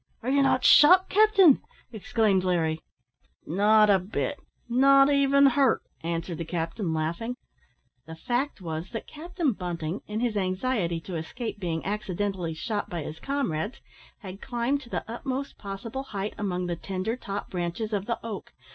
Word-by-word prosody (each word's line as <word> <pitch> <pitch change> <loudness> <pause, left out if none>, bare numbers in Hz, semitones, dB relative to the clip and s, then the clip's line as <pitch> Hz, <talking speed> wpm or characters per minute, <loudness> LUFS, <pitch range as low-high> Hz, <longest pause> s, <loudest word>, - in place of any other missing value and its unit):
"Och! 250 - -2
are - - +2
ye 280 0 +4
not 270 -2 +2
shot, 365 +6 +7
capting?" 400 - +6 0.3
exclaimed 220 -4 +1
Larry. 165 -3 0 0.6
"Not 210 +5 +4
a 195 - +5
bit; 210 +9 -3 0.3
not 275 +3 +5
even 280 0 +4
hurt," 270 -2 +3 0.2
answered 165 0 -3
the - - -2
captain, 165 +3 -3
laughing. 170 +10 -2 0.7
The 160 - -8
fact 245 - -2
was, 165 +1 -5
that 225 - -4
Captain 325 -2 -2
Bunting, 175 -1 -4
in 210 +1 -3
his 235 -2 0
anxiety 185 -2 -1
to 175 0 -5
escape 220 +7 -5
being 165 -4 -3
accidentally 195 -4 -2
shot 205 +5 -3
by 170 -3 -4
his 155 +2 -7
comrades, 250 - -2 0.4
had 195 -1 -9
climbed 245 +3 -1
to 240 - -13
the - - -3
utmost 260 +4 -5
possible 210 +6 -5
height 210 -6 -5
among 180 -3 -2
the 175 -1 -2
tender 190 +5 -3
top 200 -5 -6
branches 180 +5 -3
of 200 -1 -2
the 235 - -1
oak. 220 -3 -7
210 Hz, 160 wpm, -27 LUFS, 175-255 Hz, 0.7 s, shot